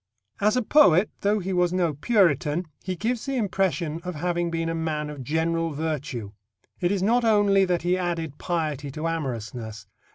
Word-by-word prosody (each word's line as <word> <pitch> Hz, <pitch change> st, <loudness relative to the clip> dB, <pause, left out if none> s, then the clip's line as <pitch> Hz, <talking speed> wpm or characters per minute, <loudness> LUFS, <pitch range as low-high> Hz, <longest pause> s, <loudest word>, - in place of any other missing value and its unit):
As 210 Hz, +4 st, +3 dB
a 250 Hz, -, +1 dB
poet, 210 Hz, -, +5 dB
though 205 Hz, +1 st, +2 dB
he 190 Hz, -1 st, -3 dB
was 180 Hz, -1 st, +2 dB
no 175 Hz, -4 st, +1 dB
Puritan, 170 Hz, -, +2 dB, 0.2 s
he 185 Hz, -1 st, -3 dB
gives 230 Hz, +7 st, -2 dB
the 275 Hz, -, -1 dB
impression 185 Hz, -7 st, 0 dB
of 180 Hz, -2 st, -5 dB
having 175 Hz, +2 st, -1 dB
been 165 Hz, 0 st, -2 dB
a 165 Hz, -, -1 dB
man 155 Hz, -2 st, -2 dB
of 145 Hz, -3 st, -7 dB
general 165 Hz, +3 st, 0 dB
virtue. 140 Hz, -8 st, -3 dB, 0.5 s
It 175 Hz, 0 st, +1 dB
is 195 Hz, -2 st, 0 dB
not 235 Hz, +4 st, +3 dB
only 205 Hz, -3 st, +4 dB
that 175 Hz, -2 st, 0 dB
he 180 Hz, +1 st, +1 dB
added 165 Hz, -5 st, -3 dB
piety 155 Hz, -5 st, -2 dB
to 155 Hz, +2 st, -3 dB
amorousness. 120 Hz, -8 st, -4 dB
170 Hz, 175 wpm, -25 LUFS, 155-195 Hz, 0.5 s, poet